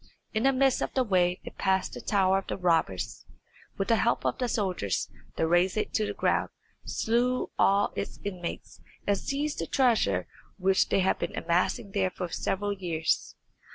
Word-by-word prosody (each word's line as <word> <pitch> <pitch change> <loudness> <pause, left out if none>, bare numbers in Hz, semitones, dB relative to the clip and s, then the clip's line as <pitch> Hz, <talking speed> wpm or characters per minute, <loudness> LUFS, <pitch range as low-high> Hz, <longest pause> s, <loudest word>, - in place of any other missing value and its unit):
In 220 - +1
the 270 +3 +4
midst 270 0 +2
of - - -1
the 260 - +3
way 180 -5 +2
they - - -6
passed 190 -1 0
the - - -7
tower 195 -2 +3
of 195 - -11
the - - -3
robbers, 165 - 0
and - - -24 0.4
with 195 - -1
the 230 - +5
help 235 - +1
of - - 0
the 250 -2 0
soldiers 185 - -1 0.2
they - - +1
razed 175 +4 +3
it 215 - -1
to 215 -1 +1
the - - -4
ground, - - +1 0.3
slew 245 +3 0
all 200 +1 +3
its 200 - -4
inmates, 180 -4 -6 0.2
and 200 - +3
seized 285 +8 -2
the 165 - -2
treasure 215 - +2 0.3
which 190 0 +2
they 195 - +3
had 190 - +1
been - - -3
amassing 180 +5 0
there 195 -2 +1
for 180 -1 -5
several 205 +4 -1
years. 170 -5 -1
195 Hz, 190 wpm, -28 LUFS, 180-225 Hz, 0.4 s, the